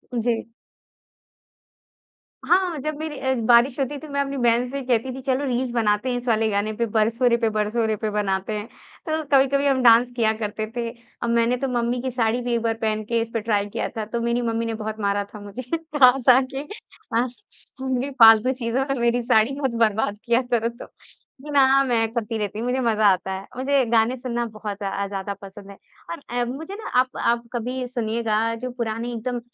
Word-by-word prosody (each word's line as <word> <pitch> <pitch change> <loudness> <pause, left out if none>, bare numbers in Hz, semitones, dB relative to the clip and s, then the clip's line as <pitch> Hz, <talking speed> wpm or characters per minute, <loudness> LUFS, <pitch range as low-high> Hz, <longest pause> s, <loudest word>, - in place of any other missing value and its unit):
जी। 230 -1 -1 2.0
हाँ, 360 -2 +2
जब 305 +3 -3
मेरी 310 -1 -5
अ, 265 0 0
बारिश 240 +3 +4
होती 275 +2 -1
थी 310 - -10
मैं 280 -1 -1
अपनी 275 0 -3
बहन 240 0 +2
से 275 +2 -4
कहती 250 +1 0
थी 265 - -7
चलो 265 +1 0
रील्स 250 -1 -1
बनाते 215 0 +1
हैं 245 - -1
इस 245 +1 -7
वाले 225 -1 +2
गाने 205 +1 -1
पे, 235 +2 -1
बरसों 230 +3 +2
रे 235 - +3
पे, 230 -2 +1
बरसों 215 +2 0
रे 220 - 0
पे 215 0 -3
बनाते 200 -1 -1
हैं। 210 +1 -6 0.4
तो 315 0 -1
कभी-कभी 275 +1 +4
हम 270 -2 +2
डांस 240 +1 +6
किया 220 -2 +2
करते 215 0 -3
थे। 235 -1 -2 0.3
अब 235 - -1
मैंने 235 +1 +2
तो 270 +2 -2
मम्मी 240 -1 -1
की 260 0 -3
साड़ी 235 0 0
भी 245 0 -2
एक 235 - +1
बार 225 0 0
पहन 215 -1 0
के 235 +2 0
इस 230 - -4
पे 225 - -1
ट्राई 205 -2 0
किया - - -2
था, 220 - -2
तो 235 +2 -3
मेरी 235 +1 0
मम्मी 230 -1 -1
ने 230 - -2
बहुत 220 0 -5
मारा 200 0 0
था 210 - -8
मुझे। 205 +4 -7 0.2
कहा 295 -6 +5 0.2
था 255 +1 +8
कि 275 +2 -5 0.5
हाँ, 240 +2 +2 0.5
तुम 260 -1 -1
भी 270 +3 -2
फ़ालतू 225 +2 +8
चीज़ों 240 +4 0
में 275 -2 -1
मेरी 235 +1 +2
साड़ी 240 +3 +2
मत 265 -3 0
बर्बाद 210 -1 -1
किया 235 +1 +3
करो 230 -1 +2
तुम। 235 +1 -11 0.7
ना, 275 -1 +5
मैं 235 -4 +1
करती 225 -1 -3
रहती 210 0 -3
हूँ, 230 - -3
मुझे 255 +1 0
मज़ा 220 -3 +3
आता 190 -1 +2
है। 190 +1 -5
मुझे 270 0 +2
गाने 230 +2 +3
सुनना 240 -1 -3
बहुत 210 -1 -6
अ, 200 0 -2
ज़्यादा 195 0 -4
पसंद 195 0 -11
है 200 - -13 0.3
और 170 - -5
अ, 245 0 -1
मुझे 295 +10 -6
न - - -7
आप 255 0 +2
आप 235 0 +1
कभी 250 +2 -3
सुनिएगा, 230 -2 -1
जो 250 +2 -5
पुराने 235 -1 -3
एकदम 240 +2 -3
235 Hz, 215 wpm, -23 LUFS, 220-255 Hz, 2.0 s, था